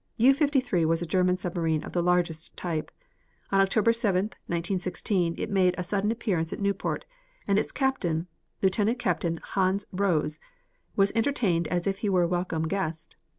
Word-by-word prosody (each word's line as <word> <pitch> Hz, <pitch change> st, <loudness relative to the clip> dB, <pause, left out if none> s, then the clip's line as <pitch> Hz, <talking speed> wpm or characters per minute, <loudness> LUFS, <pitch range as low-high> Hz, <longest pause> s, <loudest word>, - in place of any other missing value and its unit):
U 255 Hz, +4 st, +6 dB
53 270 Hz, -, +1 dB
was 165 Hz, +1 st, +1 dB
a -, -, -2 dB
German 180 Hz, +1 st, +2 dB
submarine 165 Hz, -4 st, -1 dB
of -, -, -7 dB
the 175 Hz, -, 0 dB
largest 175 Hz, -2 st, 0 dB
type. 165 Hz, -3 st, -3 dB, 0.6 s
On 195 Hz, 0 st, +4 dB
October 215 Hz, +3 st, +3 dB
7, 205 Hz, -3 st, +1 dB, 0.2 s
1916, 175 Hz, 0 st, -1 dB
it 215 Hz, -, -3 dB
made 185 Hz, -2 st, +3 dB
a 180 Hz, -, -2 dB
sudden 200 Hz, +3 st, 0 dB
appearance 195 Hz, -8 st, -1 dB
at -, -, -5 dB
Newport, 200 Hz, -1 st, -1 dB, 0.4 s
and 200 Hz, 0 st, +3 dB
its -, -, -2 dB
captain, 180 Hz, -, 0 dB, 0.4 s
Lieutenant 205 Hz, +5 st, +2 dB
Captain 170 Hz, -6 st, -1 dB
Hans 190 Hz, +1 st, 0 dB
Rose, 175 Hz, -6 st, 0 dB, 0.6 s
was 195 Hz, 0 st, +4 dB
entertained 220 Hz, -, +1 dB
as 175 Hz, +1 st, -1 dB
if 195 Hz, -1 st, -1 dB
he 210 Hz, -, -1 dB
were 185 Hz, -2 st, +3 dB
a -, -, +2 dB
welcome 175 Hz, -2 st, -1 dB
guest. 165 Hz, -3 st, -3 dB
185 Hz, 165 wpm, -27 LUFS, 170-205 Hz, 0.6 s, U